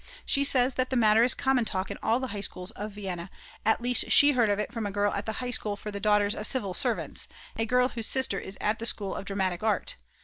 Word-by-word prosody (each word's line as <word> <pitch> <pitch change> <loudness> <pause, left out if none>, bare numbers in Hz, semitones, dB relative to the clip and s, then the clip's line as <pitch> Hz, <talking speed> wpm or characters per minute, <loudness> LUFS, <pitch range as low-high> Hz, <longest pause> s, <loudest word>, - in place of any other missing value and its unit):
She 280 - +2
says 260 -2 +2
that 255 +1 -1
the 260 - -2
matter 220 -2 +4
is 245 +2 +4
common 265 -2 +1
talk 190 -3 -3
in - - -7
all 230 +3 +1
the 260 -1 -4
High 205 -2 -5
Schools 180 0 -2
of 210 -2 -7
Vienna, 190 -3 -6 0.3
at 220 +1 +1
least 245 0 +3
she 290 0 +7
heard 240 -5 +2
of 205 - +1
it 210 +3 -4
from 225 -3 -3
a - - -5
girl 205 +1 0
at 200 - -4
the 220 - -2
High 250 +2 -4
School 210 -3 -1
for 210 +1 -7
the 200 - -5
Daughters 210 0 +2
of 210 - -3
Civil 205 -8 -1
Servants, - - -1 0.3
a 225 - -2
girl 250 +1 +2
whose 230 -3 -2
sister 260 -7 +3
is 190 - -8
at 210 +1 -1
the 230 - -1
School 200 -4 -3
of - - -6
Dramatic 190 -3 -2
Art. 215 -3 -1
215 Hz, 265 wpm, -27 LUFS, 200-245 Hz, 0.3 s, she